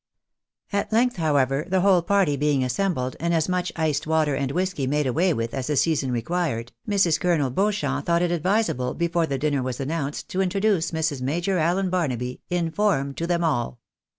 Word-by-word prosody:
At 200 +2 -1
length, 245 +1 +2
however, 145 -3 +1
the 190 0 +2
whole 190 -2 +4
party 190 -4 +2
being 145 -1 +1
assembled, 130 -1 -1
and 170 +1 0
as 160 -1 +1
much 180 -1 -1
iced 155 -2 -1
water 155 -2 +2
and 135 -1 -2
whisky 180 -5 -1
made 150 +2 +1
away 165 +9 +2
with 115 -5 -2
as 130 -2 -3
the 150 - 0
season 145 -3 +1
re 120 -2 -1
quired, 140 -8 -2 0.2
Mrs. 185 -6 +3
Colonel 165 -8 +1
Beauchamp 205 +8 -1
thought 170 0 +2
it 175 - +1
advisable, 175 - 0
before 170 -1 0
the 140 - -2
dinner 145 0 0
was 125 -1 -4
announced, 145 0 -3
to 190 - -1
introduce 195 -2 +1
"Mrs. 160 -4 -2
Major 170 +8 0
Allen 180 +4 +1
Barnaby" 125 -8 -2
in 175 -2 -1
form, 160 -9 +1
to 165 +4 -3
them 175 -1 +1
all. 125 -6 -1
160 Hz, 190 wpm, -24 LUFS, 135-180 Hz, 0.2 s, whole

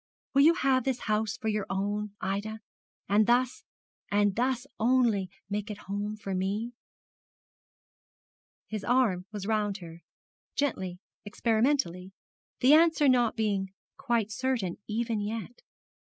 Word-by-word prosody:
Will 275 - +5
you 325 +4 +6
have 265 -6 +2
this 265 -1 0
old - - -7
house 215 0 0
for 220 - -5
your 210 -2 -1
own, 205 +1 -2
Ida, 200 +3 -2 0.5
and 210 +2 +3
thus, 245 +1 +2 0.5
and 205 -1 +2
thus 250 +1 0
only, 230 -5 +3 0.2
make 205 +1 -3
it 210 - -5
home 205 +2 -3
for 195 -2 -5
me? 200 +5 -1 1.9
His 215 -2 -5
arm 225 -8 +2
was 205 -3 -5
round 210 -2 0
her, 170 -3 -11 0.5
gently, 190 -11 -1 0.3
experimentally, 215 -4 0 0.5
the 260 +4 +7
answer 320 -2 +5
not 245 -3 +3
being 200 -3 -1 0.2
quite 230 -4 0
certain, 235 -7 -1
even 225 0 -1
yet. 220 +3 -5
215 Hz, 130 wpm, -29 LUFS, 200-245 Hz, 1.9 s, the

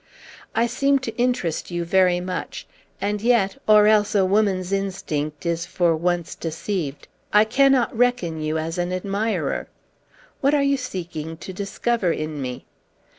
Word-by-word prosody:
I 230 - +3
seem 275 +4 +2
to 240 -4 -5
interest 240 -10 -1
you 175 -1 -3
very 180 0 +3
much; 180 0 -5 0.3
and 205 +1 -1
yet 225 -5 +2
or 210 -1 +7
else 210 0 +3
a 195 -2 +4
woman's 190 -2 +1
instinct 160 -6 -3
is 170 0 -1
for 170 -2 +2
once 175 0 -1
deceived 160 -3 -4 0.2
I 210 +1 +6
cannot 265 +1 +3
reckon 225 -10 +1
you 155 +1 -1
as 165 +2 -3
an 175 0 -1
admirer. 200 +4 -1 0.7
What 280 +1 +3
are 285 - +3
you 280 0 +3
seeking 170 - -5
to 190 - -8
discover 200 0 -1
in 155 -2 -3
me?" 125 -1 -5
190 Hz, 150 wpm, -23 LUFS, 170-225 Hz, 0.7 s, or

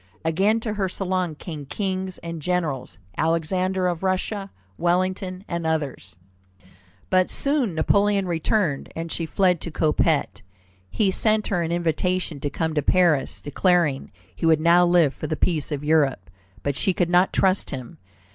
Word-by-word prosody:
Again 195 +8 +2
to 220 -2 -3
her 195 -3 -1
salon 185 -3 -2
came 150 -3 -8
kings 185 +3 -3
and 165 -1 -6
generals, 150 - -2 0.2
Alexander 180 +4 0
of 175 -2 -1
Russia, 195 +1 -1 0.3
Wellington, 185 - -1
and 170 -1 -3
others. 145 - -3 1.0
But 185 -1 +3
soon 275 - 0
Napoleon 200 +4 +2
returned, 170 -2 0
and 165 0 -5
she 165 - -2
fled 180 -1 +2
to - - -5
Coppet. 155 -7 0 0.5
He 200 - +1
sent 215 +2 +2
her 180 -4 0
an 165 0 -2
invitation 175 -1 -1
to 145 - -2
come 160 +2 -2
to 150 - +1
Paris, 170 -2 +2
declaring 165 -2 +1 0.2
he 165 - -1
would 160 -1 +5
now 170 +2 +5
live 170 -5 +4
for 155 - -6
the 155 - -2
peace 160 -4 0
of 145 -1 -3
Europe, 140 - +1 0.3
but 140 -1 -1
she 190 +8 +1
could 175 0 0
not 180 +1 +4
trust 190 0 +1
him. 130 -3 -7
175 Hz, 155 wpm, -23 LUFS, 155-185 Hz, 1.0 s, would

